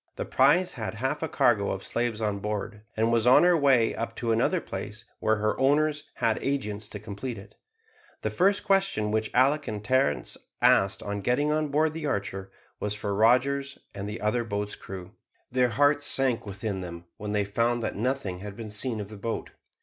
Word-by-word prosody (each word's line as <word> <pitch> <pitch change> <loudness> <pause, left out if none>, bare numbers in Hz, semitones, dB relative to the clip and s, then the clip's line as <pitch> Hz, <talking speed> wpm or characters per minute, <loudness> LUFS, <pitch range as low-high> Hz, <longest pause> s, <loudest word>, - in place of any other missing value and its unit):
The - - -4
prize 145 +8 +3
had 110 -4 -5
half 130 +6 -2
a 160 - -1
cargo 105 -7 +2
of 95 - -3
slaves 120 -2 -2
on 105 -2 -1
board, 105 +1 -4 0.2
and 115 +1 +2
was 115 0 +2
on 125 - +7
her 180 0 +5
way 135 -7 +4
up 115 - -4
to 115 -1 -1
another 115 +1 +2
place 110 +2 -7
where 110 - +2
her 110 0 0
owners 150 +2 +2
had 115 -2 +1
agents 110 -7 -2
to 105 - -7
complete 110 +4 -6
it. 100 +1 -12 0.7
The - - -1
first 195 +3 +2
question 195 - +1
which 110 0 0
Alick 135 +4 +3
and 105 -1 -5
Terence 130 - +1 0.2
asked 95 0 +4
on 100 0 -3
getting 135 +8 +1
on 155 0 +1
board 150 +2 +1
the 160 -2 -4
Archer, 95 -5 -3 0.3
was 105 0 -2
for 105 -1 -3
Rogers 135 +6 +2 0.2
and 100 0 -5
the 105 - -6
other 115 +3 +1
boat's 105 -2 -3
crew. 95 -1 -9 0.4
Their 125 0 +3
hearts 145 +5 +2
sank 130 -5 +1
within 100 0 -4
them, 85 -1 -8
when 105 0 -4
they 105 -1 +1
found 115 +4 0
that - - -2
nothing 110 -5 -2
had 100 0 -7
been 110 -1 -7
seen 110 +2 0
of 100 -1 -6
the 105 - -9
boat. 115 +3 -4
115 Hz, 195 wpm, -27 LUFS, 105-135 Hz, 0.7 s, on